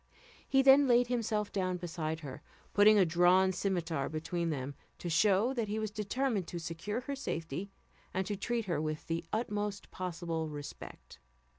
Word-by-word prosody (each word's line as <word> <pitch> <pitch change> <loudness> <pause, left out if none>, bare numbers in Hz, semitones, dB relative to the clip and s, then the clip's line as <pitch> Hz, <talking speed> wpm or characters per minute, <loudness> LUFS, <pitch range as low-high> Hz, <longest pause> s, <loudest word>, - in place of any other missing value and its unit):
He 270 0 +4
then 275 +1 +7
laid 245 0 +4
himself 220 -4 -1
down 185 -2 -1
beside 160 -2 -4
her, 135 -4 -8 0.3
putting 210 +1 +7
a 195 - +6
drawn 180 +3 +4
scimitar 175 -6 -1
between 165 +2 -2
them, 140 -2 -3 0.2
to 175 - -4
show 200 +8 +3
that 235 -4 -1
he 210 +1 -2
was 215 -1 -2
determined 215 -1 -1
to 175 - -5
secure 170 +7 -4
her 280 +2 -4
safety, 165 - -4 0.4
and 190 +1 -1
to 205 - -2
treat 230 +3 -2
her 170 -5 -1
with 155 -1 -3
the 165 0 -2
utmost 210 -2 -2
possible 165 -3 -3
respect. 145 -1 -9
185 Hz, 165 wpm, -32 LUFS, 165-215 Hz, 0.4 s, then